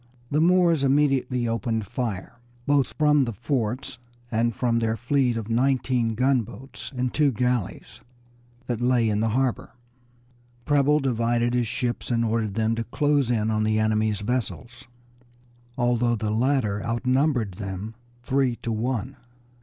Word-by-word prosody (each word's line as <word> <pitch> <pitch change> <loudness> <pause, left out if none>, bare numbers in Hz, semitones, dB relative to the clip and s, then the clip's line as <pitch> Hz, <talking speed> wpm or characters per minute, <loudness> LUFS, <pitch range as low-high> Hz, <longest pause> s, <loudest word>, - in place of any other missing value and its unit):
The 150 +2 +2
Moors 170 -3 +4
immediately 135 -3 +2
opened 115 -1 -1
fire, 115 0 -5 0.3
both 140 -2 +1
from 150 -2 +4
the 115 - -4
forts 125 +2 -3 0.3
and 115 0 +1
from 120 -2 +1
their 115 0 0
fleet 125 -1 +1
of 110 -2 -5
nineteen 125 -1 +1
gunboats 130 +1 -2
and 125 0 -1
two 150 -3 +3
galleys 125 -3 -2 0.6
that 120 -2 -3
lay 120 -2 +3
in 105 -1 0
the 110 +1 +1
harbor. 130 +1 -1 0.9
Preble 145 0 +3
divided 120 -2 0
his 120 -2 +1
ships, 125 0 -2
and 115 -1 +1
ordered 110 -3 -1
them 110 0 +1
to 115 0 -2
close 145 0 +1
in 110 -2 +1
on 110 0 +1
the 110 0 +1
enemy's 110 -1 +1
vessels, 120 +1 -4 0.9
although 120 -1 +2
the 105 -1 -2
latter 110 -3 +1
outnumbered 125 0 +1
them 100 +2 -5 0.3
three 130 -2 +1
to 115 - -2
one. 125 +3 -2
120 Hz, 140 wpm, -25 LUFS, 110-130 Hz, 0.9 s, Moors